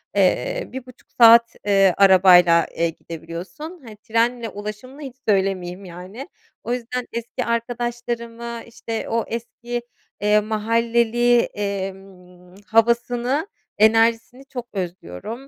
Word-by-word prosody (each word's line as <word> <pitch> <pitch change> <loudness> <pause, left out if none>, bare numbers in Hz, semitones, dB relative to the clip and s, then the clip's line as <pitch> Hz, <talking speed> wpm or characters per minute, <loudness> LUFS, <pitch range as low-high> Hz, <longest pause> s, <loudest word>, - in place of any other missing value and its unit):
eee, - - +1
1.30 255 -1 -11
saat, 230 0 +6
eee, 195 -2 +4
arabayla, 180 -3 +6
eee, 170 0 +1
gidebiliyorsun, 170 - -9
hani, 215 -2 -11
trenle 230 +2 0
ulaşımını 210 +7 -8
hiç 265 -4 -8
söylemeyeyim 190 -2 0
yani. 185 - -9 0.3
O 240 - -2
yüzden 250 0 -4
eski 235 0 -4
arkadaşlarımı, 235 0 -4
işte, 230 -1 -6
o 230 0 0
eski, 240 +1 -5 0.4
eee, 210 0 +4
mahalleli, 230 +2 +2
emm, 190 -3 -6
havasını, 240 - +1 0.3
enerjisini 225 +4 +3
çok 245 -3 -7
özlüyorum. 190 - -6
230 Hz, 105 wpm, -22 LUFS, 195-240 Hz, 0.4 s, saat